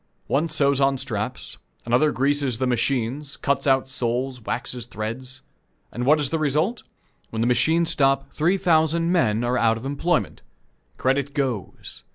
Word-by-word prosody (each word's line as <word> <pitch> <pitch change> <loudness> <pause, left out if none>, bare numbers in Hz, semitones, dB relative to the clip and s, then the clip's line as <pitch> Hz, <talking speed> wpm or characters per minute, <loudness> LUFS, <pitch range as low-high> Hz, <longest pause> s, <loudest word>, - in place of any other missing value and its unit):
One 155 +5 0
sews 140 -3 +2
on 135 0 +3
straps, 125 -2 -4 0.3
another 125 +6 +3
greases 140 -2 0
the 130 - 0
machines, 130 +3 -1
cuts 140 0 -1
out 135 -1 +3
soles, 125 0 -2
waxes 120 +1 -3
threads. 125 +5 -6 0.5
And 125 +2 -3
what 150 +2 +5
is 145 -3 0
the 165 - 0
result? 155 - 0 0.5
When 110 - -3
the 115 - +2
machines 160 +8 +2
stop, 135 0 +1
three 175 +6 +2
thousand 165 -2 +2
men 115 -11 +2
are 125 +1 +1
out 115 -1 +3
of 115 - -9
employment. 155 +5 -1 0.6
Credit 140 +2 0
goes. 130 - -4
135 Hz, 155 wpm, -23 LUFS, 120-150 Hz, 0.6 s, what